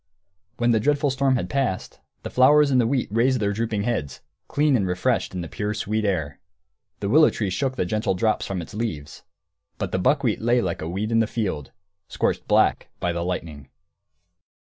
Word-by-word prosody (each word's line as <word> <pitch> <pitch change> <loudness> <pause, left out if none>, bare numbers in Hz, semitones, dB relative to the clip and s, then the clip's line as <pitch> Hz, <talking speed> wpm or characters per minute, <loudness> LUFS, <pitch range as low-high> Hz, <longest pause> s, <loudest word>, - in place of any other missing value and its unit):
When 120 0 +2
the 110 - +3
dreadful 145 +4 +1
storm 135 0 +2
had 125 - -2
passed, 130 -10 -2 0.2
the - - -6
flowers 145 +3 +5
and 130 -2 +4
the 115 - +1
wheat 130 0 0
raised 125 +4 +2
their 100 -1 0
drooping 110 -1 -2
heads, 105 - -3 0.3
clean 150 -1 +2
and 100 -6 +1
refreshed 90 +1 0
in 90 - -2
the 85 - -5
pure, 105 +10 -3
sweet 110 0 -1
air. 80 -8 -2 0.6
The 100 - -1
willow 155 +6 +6
tree 100 -4 -3
shook 130 +8 -1
the 90 - -1
gentle 105 +1 -1
drops 110 +4 0
from 95 -3 -3
its - - -12
leaves. 80 -10 -5 0.6
But - - -3
the 95 - 0
buckwheat 125 +2 +1
lay 120 +2 +3
like 90 -7 -2
a 80 - -4
weed 100 +5 -3
in 115 - +3
the 115 - +2
field, 90 - -3 0.4
scorched - - -1
black - - +2
by 90 - -1
the 85 0 -2
lightning. 80 -6 -5
110 Hz, 195 wpm, -24 LUFS, 90-125 Hz, 0.6 s, willow